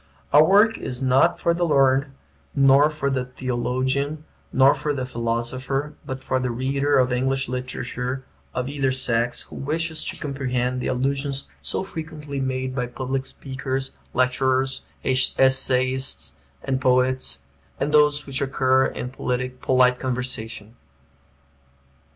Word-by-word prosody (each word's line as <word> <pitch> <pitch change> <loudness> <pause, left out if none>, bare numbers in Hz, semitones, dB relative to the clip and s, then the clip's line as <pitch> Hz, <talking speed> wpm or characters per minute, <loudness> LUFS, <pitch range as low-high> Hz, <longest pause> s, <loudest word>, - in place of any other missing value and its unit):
Our 150 +1 +8
work 205 +6 +4
is 125 - -4
not 130 0 +3
for 170 - +2
the 175 +1 -1
learned, 135 -3 +3 0.5
nor 140 +1 +6
for 140 -2 -2
the 130 -1 0
theologian, 130 +4 -2 0.3
nor 135 +1 +6
for 150 - -2
the 130 -2 -2
philosopher, 125 +4 -2
but 130 -2 -5
for 130 - 0
the 125 -1 -1
reader 135 +4 +1
of 125 -1 +3
English 135 +2 0
literature, 125 +1 -4 0.3
of 125 0 -3
either 140 -2 0
sex, 120 -2 +1
who - - -11
wishes 160 +3 -1
to - - 0
comprehend 130 -3 -2
the - - -2
allusions 135 +2 -1
so - - -2
frequently 155 -5 -6
made 130 0 -2
by 125 -2 -2
public 130 +2 -3
speakers, 135 0 -4 0.2
lecturers, 130 +1 +1 0.2
essayists, 130 0 +2 0.3
and 130 -1 -1
poets, 125 - +2 0.4
and 145 - 0
those 150 0 +4
which 135 -1 -3
occur 130 -1 +2
in 125 - -5
polite 125 0 +1
conversation. 120 -4 -4
130 Hz, 130 wpm, -23 LUFS, 125-140 Hz, 0.5 s, Our